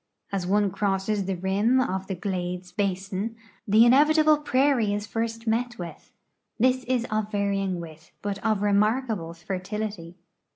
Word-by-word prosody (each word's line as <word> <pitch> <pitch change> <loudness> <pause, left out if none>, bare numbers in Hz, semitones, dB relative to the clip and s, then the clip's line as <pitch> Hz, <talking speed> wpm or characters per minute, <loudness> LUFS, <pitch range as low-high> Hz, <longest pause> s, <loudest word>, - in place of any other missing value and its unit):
As 190 -3 -2
one 205 0 +2
cro.sses 195 0 -1
the 195 - -1
rim 200 +8 +2
of 190 -6 -1
the 190 - -3
glades 180 -1 -4
basin, 195 +3 -2 0.3
the 215 +3 +6
in 240 - +6
evitable 305 +2 +5
prairie 260 -7 +2
is 205 0 -3
first 225 +1 -3
met 240 +2 0
with. 175 -2 -9 0.5
This 255 +2 +3
is 245 -1 0
of 215 0 -1
varying 195 -3 0
width, 160 -1 -10
but 200 -1 -3
of 215 -2 +1
remarkable 210 -4 +1
fertility. 185 0 -5
205 Hz, 150 wpm, -26 LUFS, 190-230 Hz, 0.5 s, the